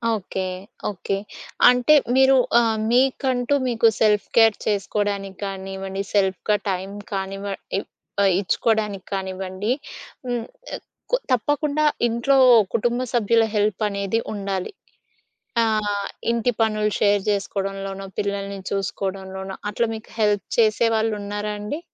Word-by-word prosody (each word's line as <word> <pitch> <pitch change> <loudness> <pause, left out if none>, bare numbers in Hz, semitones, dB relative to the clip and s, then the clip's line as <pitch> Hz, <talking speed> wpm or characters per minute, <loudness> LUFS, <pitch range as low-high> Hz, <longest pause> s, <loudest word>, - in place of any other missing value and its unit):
Okay. 190 -1 -4 0.5
Okay. 195 0 -3 0.5
అంటే, 250 +4 +4 0.2
మీరు 265 0 +6 0.2
ఆహ్, 225 -2 +2
మీకంటూ 260 +1 +2
మీకు 230 -1 +3
సెల్ఫ్ 210 -2 +3
కేర్ 225 -2 +6
చేసుకోవడానికి 200 -1 -1
కానివ్వండి, 195 0 -5
సెల్ఫ్‌గా 200 +1 +2
టైం 190 +1 -2 0.2
కానివ్వ 195 +1 -4 0.3
ఇ - - +1 0.4
ఆహ్, 190 -2 +4
ఇచ్చుకోడానికి 210 -1 0
కానివ్వండి. 190 +2 -3 0.6
హ్మ్. 240 -2 -2 0.7
కు - - +5 0.2
తప్పకుండా, 290 +5 +1 0.2
ఇంట్లో 235 +4 +2 0.4
కుటుంబ 240 +2 +1
సభ్యుల 230 -1 +3
హెల్పనేది 205 0 0
ఉండాలి. 195 - -3 0.9
ఆ! - - +4 0.7
ఇంటి 235 +1 +1
పనులు 215 -1 +1
షేర్ 205 -1 +3
చేసుకోవడంలోనో, 195 -1 -3
పిల్లల్ని 200 -1 -3
చూసుకోవడంలోనో, 190 0 -4 0.2
అట్లా 235 +2 0
మీకు 220 - -11
హెల్ప్ 210 -2 +2
చేసేవాళ్ళు 225 0 +3
ఉన్నారాండి? 210 +6 -4
205 Hz, 105 wpm, -23 LUFS, 195-230 Hz, 0.9 s, మీరు